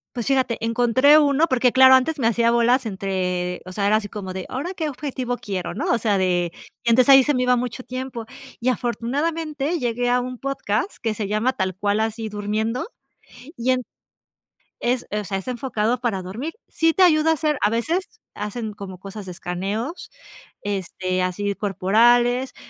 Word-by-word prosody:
Pues, 240 -2 -3
fíjate, 260 -4 +1
encontré 245 +5 +5
uno 295 +1 +4
Porque, 255 -3 +2
claro 260 +1 +8
antes 290 +4 +1
me 230 - +2
hacía 235 +1 +2
bolas 240 +2 +3
entre 185 -3 -2
o 185 - -8
sea, 200 +1 -1
era 215 - +4
así 205 -1 -5
como 190 -3 -6
de, 185 -1 -5
¿ahora 315 +9 -4
qué 320 -4 -2
objetivo 255 -3 -4
quiero? 185 -4 -4
¿no? - - -3
O - - +3
sea, 215 -3 +1
de 175 -2 +1 0.3
entonces 240 +2 +4
ahí 270 0 +8
se 295 - +1
me 255 -2 +1
iba 250 0 +4
mucho 245 +1 -3
tiempo. 255 -2 -6 0.3
Y 245 - +1
afortunadamente 290 +6 -1
llegué 245 -1 -1
a 245 +1 +3
un 250 0 -5
podcast 275 - -2
que 225 -2 -1
se 210 -1 -4
llama 215 +5 +1
tal 190 -4 -2
cual 205 +2 0
así 220 0 -2
durmiendo. 215 - -2 0.7
Y 245 +2 +1
en 255 0 0 1.0
es 245 +1 0
o 210 0 -1
sea, 195 0 -2
es 195 - -8
enfocado 240 -2 -1
para 225 -7 -1
dormir. 230 - -5
Sí 325 0 +2
te 380 - +3
ayuda 320 -3 +5
a - - +3
hacer, 305 -2 0
a 205 - +4
veces 340 - -2
hacen 210 +1 -4
como 195 -3 -8
cosas 195 +1 -9
escaneos, 195 - -4 0.5
este, 185 -2 -2
así 200 +3 -1
corporales, 240 +6 +2
235 Hz, 180 wpm, -22 LUFS, 205-260 Hz, 1.0 s, claro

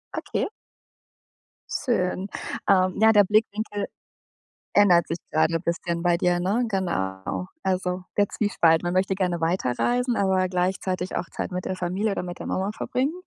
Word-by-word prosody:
Okay. - - -2 1.2
Schön. 195 -7 -1 0.4
Ähm, 185 -2 +4
ja, 220 0 +7
der 205 -1 +6
Blickwinkel 210 0 0 0.9
ändert 180 -5 +5
sich 165 - -2
grade 160 +1 +2
bisschen 170 0 -2
bei 175 -1 +3
dir, 175 0 +2
ne? 210 +7 +1
Genau. 170 - -2 0.2
Also, 185 -1 -1
der 205 -1 +4
Zwiespalt. 165 -6 +2
Man 175 +1 -1
möchte 190 +1 +1
gerne 180 -3 -1
weiterreisen, 195 - +1
aber 190 -1 +2
gleichzeitig 185 0 -1
auch 170 - -1
Zeit - - -4
mit 180 0 -4
der 185 - -2
Familie 185 +4 -1
oder 190 - -2
mit 175 -1 -7
der - - -6
Mama 195 +2 -1
verbringen, 260 +7 -1
185 Hz, 150 wpm, -25 LUFS, 175-205 Hz, 1.2 s, ja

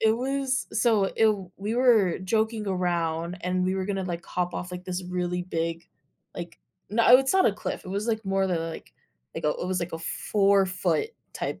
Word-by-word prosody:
it 220 0 +4
was 270 +1 -1
so 220 -5 +3
i 225 - +6 0.3
we 210 +4 -3
were 230 -8 +4
joking 220 +2 0
around 175 -2 -1
and 180 0 0
we 185 +1 +1
were 190 -1 -1
gonna 195 -1 -2
like 170 -2 -4
hop 180 0 -2
off 180 0 -4
like, 180 0 -7
this 185 0 -3
really 180 0 -2
big, 165 -1 -3 0.5
like 170 -1 -7 0.3
no, 230 +4 +7
it's 270 +4 +1
not 380 0 +5
a 205 - +3
cliff. 205 - -5
It - - -9
was 200 +4 -2
like 220 -2 -1
more 195 0 +1
than 175 -3 0
like 165 0 -6 0.4
like, - - -5
it 150 +3 0
was 185 -1 0
like 170 0 -4
a 165 - -3
4' 195 - +1 0.2
type - - -3
190 Hz, 195 wpm, -26 LUFS, 180-220 Hz, 0.5 s, no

